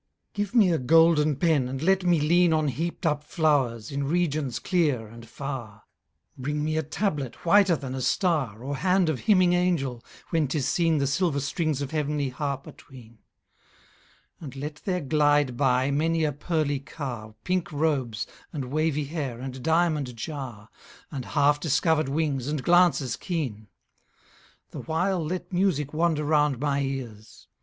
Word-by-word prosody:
_ - - -51
Give 205 +3 -3
me 205 -6 +5
a 165 - +1
golden 155 +2 +4
pen, 145 -3 +2
and 130 +1 -4
let 190 +5 +2
me 175 -2 +3
lean 170 +3 +3
On 155 -2 +1
heap'd 170 +7 -4
up 150 -2 +1
flowers, 140 -8 0
in 140 0 -2
regions 150 -5 0
clear, 150 - 0
and 115 +1 -13
far; 120 -6 -7 0.5
Bring 150 +3 -3
me 155 +1 -1
a 160 - +1
tablet 150 - -3
whiter 195 0 +5
than 135 -4 -6
a 130 - -4
star, 130 - 0
Or 140 +1 -3
hand 180 +1 +2
of 145 -5 -1
hymning 185 -4 +4
angel, 160 -9 0 0.3
when 160 -3 +2
'tis 135 0 -1
seen 165 -2 +2
The 140 - +1
silver 145 +1 +1
strings 145 0 -1
of 135 - -6
heavenly 150 -2 -1
harp 140 +1 -4
atween: 115 -4 -14 1.2
And 140 -5 -9
let 150 +2 -6
there 180 -2 0
glide 145 -2 +2
by 130 +1 +2
many 160 +3 +1
a 150 - +1
pearly 145 -1 -1
car, 125 -6 -7
Pink 180 -2 -1
robes, 140 -7 -1 0.3
and 135 -5 -5
wavy 155 -1 0
hair, 140 -6 -4
and 130 0 -6
diamond 160 -5 +1
jar, 115 -4 -7 0.4
And 135 -5 -5
half 145 0 +2
discovered 155 -1 +1
wings, 140 -3 -1
and 150 -3 -2
glances 175 -8 +3
keen. 130 - -4 1.0
The - - -7
while 175 +2 -1
let 180 +3 -5
music 175 -6 +1
wander 160 -1 +1
round 150 -3 +2
my 140 0 0
ears. 125 -6 -6
150 Hz, 160 wpm, -26 LUFS, 130-165 Hz, 1.2 s, me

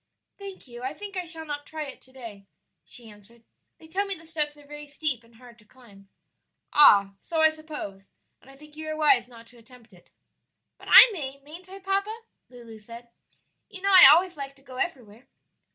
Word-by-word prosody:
"Thank 395 -6 -11
you, 240 -1 -11
I 260 +4 -5
think 405 +1 -10
I 365 -1 -4
shall 325 -1 -5
not 290 -1 -7
try 315 -1 -6
it 275 -3 -10
to 260 - -18
day," 225 -7 -12 0.4
she 240 -3 -6
answered; 215 +2 -18 0.3
"they 320 - -17
tell 390 +5 -2
me 390 - -1
the 325 -1 -16
steps 300 -2 -4
are 290 - -18
very 295 0 -11
steep 285 -4 -2
and 230 0 -24
hard 240 0 -17
to - - -21
climb." 205 -4 -20 0.6
"Ah, 200 -9 +6
so 325 -2 -3
I 315 - +5
suppose, 300 -12 -10 0.3
and 265 - -20
I 270 - -16
think 300 +1 -17
you 315 0 -8
are 310 - -4
wise 275 -6 +3
not 230 -2 -15
to 240 0 -19
attempt 230 -2 -20
it." 175 - -21 0.7
"But - - -15
I - - +10
may, 275 -6 -6
mayn't 340 +6 -13
I, 385 - -10
papa?" 395 +3 -3 0.3
Lulu 235 -3 -13
said. 235 +2 -13 0.6
"You 390 -3 -12
know 395 - +1
I 365 -6 +10
always 355 +4 +4
like 275 -1 -8
to 270 - -23
go 255 -2 -12
everywhere." 245 - -6
280 Hz, 210 wpm, -25 LUFS, 235-320 Hz, 0.7 s, I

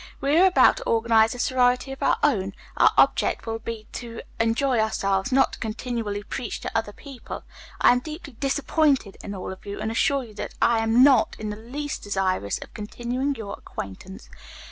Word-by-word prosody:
We 280 +2 +1
are 380 - +7
about 370 - +5
to - - -6
organize 225 0 +3
a - - -7
sorority 250 +1 +2
of 270 - -8
our - - +3
own. 195 -9 +1 0.2
Our - - +6
object - - +3
will 225 0 -3
be 225 -1 -6
to 230 -2 -7 0.2
enjoy 230 +2 +2
ourselves, 195 -2 0
not 270 +1 +3
to - - -8
continually 220 -2 -3
preach 245 +2 -5
to - - -6
other 225 -2 0
people. 270 +3 -9 0.4
I - - +6
am 245 - +3
deeply 305 +1 -9
disappointed 275 - +1
in 205 - -6
all 185 - -5
of 190 - -15
you, 200 0 -6
and 215 +1 -2
assure 275 +4 +1
you 225 -3 -12
that 205 - -6
I 235 -1 +3
am 225 +3 +4
not 265 -5 +5
in 215 -1 -4
the - - -5
least 270 +7 -5
desirous 190 - -1
of - - -18
continuing 245 +6 -3
your 215 -4 -6
acquaintance. 100 - -9
230 Hz, 190 wpm, -24 LUFS, 210-265 Hz, 0.4 s, are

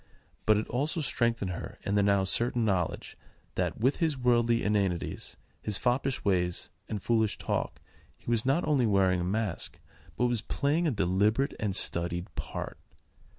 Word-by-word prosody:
But 110 -1 +6
it 110 - -1
also 145 +7 -1
strengthened 115 -8 0
her 85 - -6
in 100 - -1
the 100 - +4
now 100 -1 +3
certain 120 +4 +1
knowledge 95 -5 -1 0.4
that, - - -1
with 130 +5 +2
his 160 -5 +1
worldly 120 -2 +3
inanities, 100 -4 -1 0.2
his 105 -2 0
foppish 130 +1 0
ways, 90 -3 0 0.2
and 105 - -2
foolish 110 +1 +1
talk, - - -2 0.4
he - - -28
was 115 -1 +2
not 135 +7 +1
only 135 -6 +3
wearing 95 -3 +3
a - - -1
mask, 100 +1 -2 0.4
but 125 - +2
was 120 -3 +1
playing 150 +8 +1
a - - +2
deliberate 105 +5 +2
and 100 -3 -1
studied 85 0 -2
part. - - -5
110 Hz, 160 wpm, -29 LUFS, 95-125 Hz, 0.4 s, But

